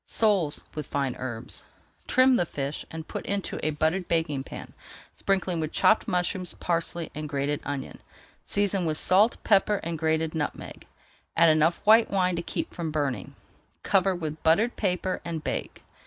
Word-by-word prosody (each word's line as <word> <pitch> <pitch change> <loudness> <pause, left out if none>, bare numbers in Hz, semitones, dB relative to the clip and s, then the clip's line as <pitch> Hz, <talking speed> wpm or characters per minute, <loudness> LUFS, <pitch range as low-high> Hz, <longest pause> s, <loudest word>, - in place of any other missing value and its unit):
SOLES 195 -9 +2
WITH 150 -3 -5
FINE 140 -3 -1
HERBS 120 -2 -2 0.4
Trim 255 0 +5
the 175 - +1
fish 140 0 -4
and 160 0 -7
put - - -5
into 200 -1 -2
a 155 - 0
buttered 160 +4 0
baking 155 -5 0
pan, - - -9 0.4
sprinkling 190 -3 0
with 155 -1 -2
chopped 220 - +3
mushrooms, 180 0 -1
parsley, 170 -1 -1
and 150 0 -5
grated 140 +1 -1
onion. 140 -2 -5 0.4
Season 200 -3 0
with 155 -1 0
salt, 200 +8 +4
pepper, 210 0 +4
and 165 -1 -3
grated 160 0 0
nutmeg, 150 -3 -5 0.5
add 165 0 +7
enough 155 +4 +2
white 220 +2 +6
wine 185 -2 +1
to 170 - -2
keep - - -4
from 170 -2 -3
burning, 140 -9 -2 0.5
cover 195 -1 +2
with 155 -3 -5
buttered 205 +9 +3
paper, 185 -2 -1
and 165 -2 -4
bake. - - -4
165 Hz, 160 wpm, -27 LUFS, 150-190 Hz, 0.5 s, add